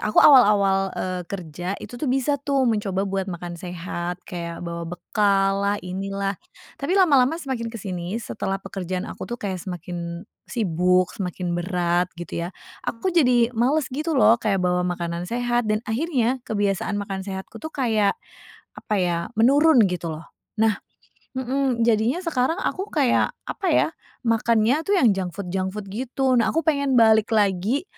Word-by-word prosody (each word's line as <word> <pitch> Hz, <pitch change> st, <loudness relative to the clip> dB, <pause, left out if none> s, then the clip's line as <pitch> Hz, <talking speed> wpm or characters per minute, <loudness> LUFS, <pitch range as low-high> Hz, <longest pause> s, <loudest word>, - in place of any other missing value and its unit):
aku 215 Hz, -, +1 dB
awal-awal, 200 Hz, -7 st, +6 dB
eee, 185 Hz, -1 st, -2 dB
kerja 180 Hz, 0 st, -5 dB
itu -, -, -9 dB
tuh, 305 Hz, -, -1 dB
bisa 270 Hz, +2 st, +1 dB
tuh 275 Hz, -1 st, +1 dB
mencoba 205 Hz, -4 st, 0 dB
buat 195 Hz, -1 st, -2 dB
makan 175 Hz, 0 st, -6 dB
sehat 175 Hz, 0 st, -5 dB
kayak 170 Hz, -1 st, -6 dB
bawa 170 Hz, 0 st, -4 dB
bekal 195 Hz, +2 st, +1 dB
lah, 205 Hz, +1 st, +1 dB
inilah, 195 Hz, +2 st, -3 dB, 0.4 s
tapi 310 Hz, +7 st, 0 dB
lama-lama 280 Hz, -7 st, +5 dB
semakin 260 Hz, -5 st, -3 dB
ke -, -, -6 dB
sini, 180 Hz, -1 st, -4 dB
setelah 195 Hz, -1 st, -3 dB
pekerjaan 185 Hz, -1 st, -4 dB
aku -, -, -7 dB
tuh 240 Hz, -, -3 dB
kayak 190 Hz, -3 st, -3 dB
semakin 175 Hz, -1 st, -6 dB, 0.2 s
sibuk, 180 Hz, -4 st, +1 dB
semakin 180 Hz, -2 st, -3 dB
berat, 175 Hz, -1 st, +1 dB
gitu 170 Hz, 0 st, -4 dB
ya, 180 Hz, -, -10 dB, 0.3 s
aku 300 Hz, +11 st, -1 dB
jadi 250 Hz, -8 st, +4 dB
males 270 Hz, +3 st, +2 dB
gitu 310 Hz, +5 st, -2 dB
lho 235 Hz, -3 st, +5 dB
kayak 200 Hz, -5 st, 0 dB
bawa 180 Hz, 0 st, +1 dB
makanan 175 Hz, 0 st, -3 dB
sehat, 240 Hz, 0 st, 0 dB
dan 215 Hz, +1 st, 0 dB
akhirnya 255 Hz, 0 st, 0 dB
kebiasaan 205 Hz, -2 st, -1 dB
makan 195 Hz, -1 st, -5 dB
sehatku 190 Hz, -1 st, -6 dB
tuh 315 Hz, -, -6 dB
kayak, 220 Hz, -6 st, +2 dB, 0.6 s
apa 210 Hz, -, -3 dB
ya, 175 Hz, -2 st, +1 dB, 0.2 s
menurun, 285 Hz, +4 st, +5 dB
gitu 175 Hz, -2 st, -3 dB
lho. 155 Hz, +1 st, -8 dB, 0.4 s
Nah 220 Hz, -1 st, +3 dB, 0.6 s
mhm, 260 Hz, -2 st, 0 dB
jadinya 230 Hz, -, +2 dB
sekarang 310 Hz, -2 st, +1 dB
aku 385 Hz, +2 st, -2 dB
kayak, 275 Hz, -6 st, +2 dB, 0.2 s
apa 390 Hz, -, -3 dB
ya, -, -, +4 dB, 0.4 s
makannya 230 Hz, +3 st, +2 dB
tuh 405 Hz, -, +3 dB
yang 240 Hz, -8 st, +5 dB
junk 185 Hz, -2 st, -3 dB
food 200 Hz, -3 st, -5 dB
junk 190 Hz, 0 st, -1 dB
food, 210 Hz, -, -4 dB
gitu. 260 Hz, +4 st, -1 dB
Nah, 230 Hz, -2 st, +3 dB
aku 325 Hz, -, 0 dB
pengen 280 Hz, -4 st, +1 dB
balik 220 Hz, -1 st, +5 dB
lagi 205 Hz, -, +1 dB
205 Hz, 160 wpm, -23 LUFS, 180-250 Hz, 0.6 s, awal-awal